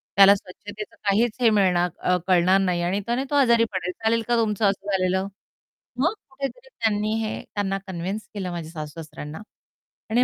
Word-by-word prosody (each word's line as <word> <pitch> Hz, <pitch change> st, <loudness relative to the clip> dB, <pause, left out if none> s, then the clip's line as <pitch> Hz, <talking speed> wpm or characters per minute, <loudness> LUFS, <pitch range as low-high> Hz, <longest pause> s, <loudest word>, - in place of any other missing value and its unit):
त्याला 200 Hz, +1 st, +8 dB
स्वच्छतेचं 205 Hz, +3 st, -9 dB
काहीच 215 Hz, +3 st, +2 dB
हे 235 Hz, -, +6 dB
मिळणार 180 Hz, -4 st, +3 dB
अ, 180 Hz, 0 st, +2 dB
कळणार 185 Hz, +1 st, +4 dB
नाही 180 Hz, -2 st, +1 dB
आणि 185 Hz, +4 st, 0 dB
त्याने 240 Hz, +4 st, 0 dB
तो -, -, +1 dB
आजारी 235 Hz, -4 st, +5 dB
पडेल. 180 Hz, -1 st, -2 dB
चालेल 230 Hz, +1 st, +3 dB
का 240 Hz, -, +3 dB
तुमचं 215 Hz, -2 st, +1 dB
असं 195 Hz, 0 st, -4 dB
झालेलं? 190 Hz, 0 st, +1 dB, 0.7 s
मग 320 Hz, -, +2 dB, 0.2 s
कुठेतरी 275 Hz, -, -6 dB
त्यांनी 215 Hz, -, 0 dB
हे 215 Hz, -, -3 dB
त्यांना 195 Hz, -1 st, -1 dB
कन्विन्स 190 Hz, +4 st, -4 dB
केलं 190 Hz, -3 st, -4 dB
माझ्या 160 Hz, -2 st, -5 dB
सासू-सासऱ्यांना 150 Hz, 0 st, -8 dB, 0.7 s
आणि 240 Hz, +3 st, +4 dB
200 Hz, 165 wpm, -24 LUFS, 180-225 Hz, 0.7 s, त्याला